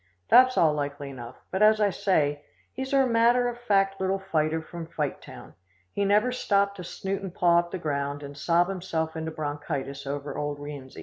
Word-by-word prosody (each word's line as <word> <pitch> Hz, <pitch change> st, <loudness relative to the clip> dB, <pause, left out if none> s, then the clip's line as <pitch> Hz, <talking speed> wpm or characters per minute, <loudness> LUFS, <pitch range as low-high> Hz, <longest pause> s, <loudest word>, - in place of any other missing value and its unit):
That's 255 Hz, 0 st, +7 dB
all 160 Hz, -2 st, +4 dB
likely 145 Hz, -1 st, -4 dB
enough, 120 Hz, -2 st, -9 dB, 0.2 s
but, 190 Hz, -, -2 dB
as 215 Hz, 0 st, +6 dB
I 205 Hz, -2 st, +3 dB
say, 145 Hz, -7 st, 0 dB, 0.3 s
he's 265 Hz, +1 st, -5 dB
a 270 Hz, -1 st, +4 dB
matter 240 Hz, +1 st, +3 dB
of 240 Hz, 0 st, -4 dB
fact 195 Hz, -4 st, +1 dB
little 190 Hz, +1 st, +1 dB
fighter 160 Hz, -4 st, 0 dB
from 165 Hz, +1 st, -8 dB
Fighttown. 150 Hz, -4 st, -6 dB, 0.4 s
He 200 Hz, -, 0 dB
never 210 Hz, +5 st, +3 dB
stopped 200 Hz, -5 st, +1 dB
to 180 Hz, -, -7 dB
snoot 195 Hz, +3 st, -4 dB
and 190 Hz, -2 st, -6 dB
paw 170 Hz, -1 st, +4 dB
up 175 Hz, 0 st, -3 dB
the 185 Hz, -, -4 dB
ground 145 Hz, -3 st, -3 dB
and 140 Hz, 0 st, -8 dB
sob 170 Hz, +4 st, +2 dB
himself 175 Hz, -4 st, -3 dB
into 160 Hz, 0 st, -3 dB
bronchitis 145 Hz, -3 st, -4 dB
over 145 Hz, +1 st, -4 dB
old 145 Hz, -1 st, -3 dB
Rienzi. 145 Hz, -2 st, -9 dB
170 Hz, 190 wpm, -27 LUFS, 145-200 Hz, 0.4 s, That's